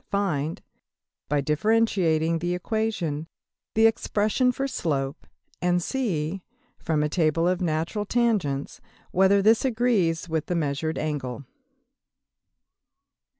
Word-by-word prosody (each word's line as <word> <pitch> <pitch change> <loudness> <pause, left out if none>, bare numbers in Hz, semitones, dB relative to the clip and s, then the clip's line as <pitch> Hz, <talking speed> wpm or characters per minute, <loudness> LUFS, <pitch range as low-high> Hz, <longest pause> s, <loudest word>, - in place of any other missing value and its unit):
Find, 170 -6 -1 0.7
by 145 0 +2
differentiating 165 -1 +2
the 175 +1 -1
equation, 180 -7 -2 0.5
the 220 +1 +5
expression 225 +2 +2
for 270 +2 -2
slope; 145 - -2 0.3
and 180 0 +2
see, 185 - -2 0.4
from 155 -3 0
a - - +2
Table 165 +1 +1
of 180 0 0
Natural 170 +5 -1
Tangents, 200 - 0 0.3
whether 195 +2 +4
this 220 +2 +4
agrees 220 -10 +1
with 160 -2 -2
the 180 - -1
measured 155 0 -1
angle. 140 -3 -3
175 Hz, 105 wpm, -25 LUFS, 155-215 Hz, 0.7 s, the